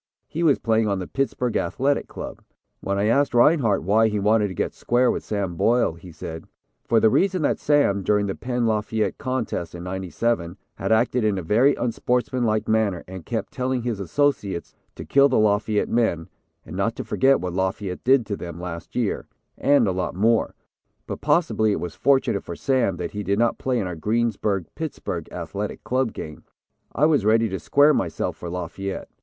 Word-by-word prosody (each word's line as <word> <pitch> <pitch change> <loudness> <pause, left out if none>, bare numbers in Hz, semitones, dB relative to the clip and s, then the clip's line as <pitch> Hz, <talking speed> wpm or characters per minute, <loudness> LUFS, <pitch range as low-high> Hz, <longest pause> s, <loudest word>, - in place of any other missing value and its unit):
He 165 - -4
was 155 -5 +4
playing 110 -1 +1
on 100 -1 0
the 95 - -4
Pittsburgh 125 -1 -2
Athletic 135 +11 0
Club." - - -8 0.4
When 100 0 -2
I 100 - +1
asked 130 +4 +2
Rinehart 120 - +4
why 110 +5 +4
he 105 -1 -1
wanted 105 +1 +3
to 95 - -7
get - - -2
square 125 +1 +2
with - - -4
Sam 100 -4 -2
Boyle, 115 +1 +2
he 85 +2 -12
said: 80 +1 -8 0.4
"For 115 - +4
the 110 0 +4
reason 185 - +2
that - - +1
Sam, 145 -10 +2
during 105 +1 +2
the 95 - -2
Penn 125 +1 -2
Lafayette 110 0 -1
contest 120 - -3
in 85 - -7
'97, 95 0 -2 0.2
had - - -3
acted 120 +2 +2
in 105 -2 +1
a 95 - -3
very 120 - +3
unsportsmanlike 120 -2 0
manner 110 -5 +1
and 95 -3 -9
kept - - -3
telling 125 -1 -1
his 115 -4 -2
associates 100 - -1 0.2
to - - -8
kill 140 0 +5
the 130 - +2
Lafayette 105 0 +2
men 100 -9 0 0.4
and - - -9
not - - 0
to - - -5
forget 135 +1 +3
what 90 -1 -4
Lafayette 95 0 -2
did 130 -1 +4
to 105 -1 -3
them 85 -3 -8
last 85 -1 -7
year, 120 -5 -1 0.3
and 140 -5 +3
a - - +2
lot 90 -1 -3
more, 110 +4 +2 0.5
but - - -6
possibly 110 -10 +2
it - - -2
was 90 -2 -5
fortunate 130 - +2
for 85 - -6
Sam 120 -8 +1
that 85 -1 -4
he 105 - -4
did 100 0 0
not 115 +1 +1
play 130 -1 0
in 105 - -1
our 90 -1 -4
Greensburg 105 0 0
Pittsburgh 115 - -5
Athletic 90 +4 -5
Club 130 -2 0
game. 75 -1 -8 0.5
I 150 - +2
was 150 -8 +3
ready 115 +2 +3
to 95 -1 -4
square 145 +2 +4
myself 85 - -2
for 85 - -7
Lafayette." 90 +2 -5
110 Hz, 195 wpm, -23 LUFS, 95-125 Hz, 0.5 s, kill